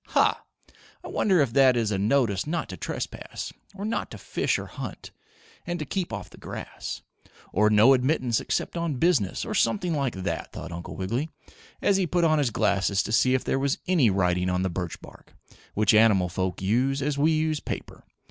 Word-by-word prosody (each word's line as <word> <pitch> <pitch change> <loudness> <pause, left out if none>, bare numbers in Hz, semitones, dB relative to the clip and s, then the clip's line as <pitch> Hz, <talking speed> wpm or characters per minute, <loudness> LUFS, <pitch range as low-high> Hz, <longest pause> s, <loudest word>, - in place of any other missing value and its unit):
"Ha! - - +2 0.6
I - - -7
wonder 185 -6 +3
if 130 -5 0
that 130 -2 +5
is 110 -3 0
a 100 - 0
notice 105 -1 +1
not 170 +2 -2
to - - -5
trespass, - - -5 0.2
or 200 +1 -5
not 220 - -2
to - - -8
fish - - -1
or - - -5
hunt, - - -8 0.6
and 175 0 -2
to 155 - -4
keep 185 +4 -3
off - - -6
the - - -15
grass, - - -7 0.5
or 105 +3 +4
no 110 +5 +6
admittance 125 -2 +1
except - - -2
on 170 -4 -1
business 130 - +1
or 220 - -4
something 190 -5 +1
like 140 -7 -1
that?" 95 +1 -4
thought 85 +1 -7
Uncle 85 0 -7
Wiggily, 115 +12 -2 0.5
as 200 - +4
he 190 -2 +1
put 175 +2 +1
on 155 -2 +4
his 140 -4 +2
glasses 100 -3 +1
to - - -5
see 130 +3 +4
if 130 - 0
there 135 - 0
was 140 0 0
any 165 -11 +4
writing 90 -1 +1
on 90 0 0
the 95 - -1
birch 90 -1 -4
bark, - - -15 0.4
which 105 0 +3
animal 105 -5 +5
folk 95 +1 -3
use 130 +7 +1
as 145 0 -1
we 155 +3 +4
use 155 -1 0
paper. - - -6
125 Hz, 200 wpm, -26 LUFS, 100-155 Hz, 0.6 s, no